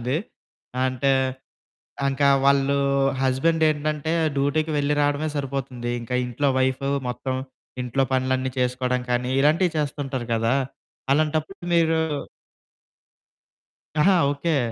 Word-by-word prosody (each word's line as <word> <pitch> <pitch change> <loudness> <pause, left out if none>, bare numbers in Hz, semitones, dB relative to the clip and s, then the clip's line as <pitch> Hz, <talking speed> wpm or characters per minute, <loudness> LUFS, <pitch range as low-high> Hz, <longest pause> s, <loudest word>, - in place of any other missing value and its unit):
చాలామంది. 125 +4 -1 0.7
అంటే 130 +1 +1 1.0
ఇంకా 140 +1 +2 0.2
వాళ్ళు 140 0 +3 0.4
హస్బెండ్ 135 +5 +1
ఏంటంటే 150 +1 -1 0.2
డ్యూటీకి 145 +3 +1
వెళ్ళి 145 +1 +1
రావడమే 145 +1 +1
సరిపోతుంది. 130 -3 -3
ఇంకా 120 +2 -5
ఇంట్లో 125 +4 0
వైఫు 130 +1 0 0.2
మొత్తం, 125 +2 -3 0.5
ఇంట్లో 125 +2 0
పనులన్నీ 130 0 0
చేసుకోవడం 125 0 0
కానీ 125 +1 0
ఇలాంటియి 160 +5 +3
చేస్తుంటారు 140 -4 -3
కదా! 115 +2 +1 0.6
అలాంటప్పుడు 155 +4 0
మీరు 165 -1 +3 2.0
ఆహా! 190 +5 +5 0.2
ఓకే. 145 +2 0
140 Hz, 100 wpm, -24 LUFS, 130-150 Hz, 2.0 s, ఆహా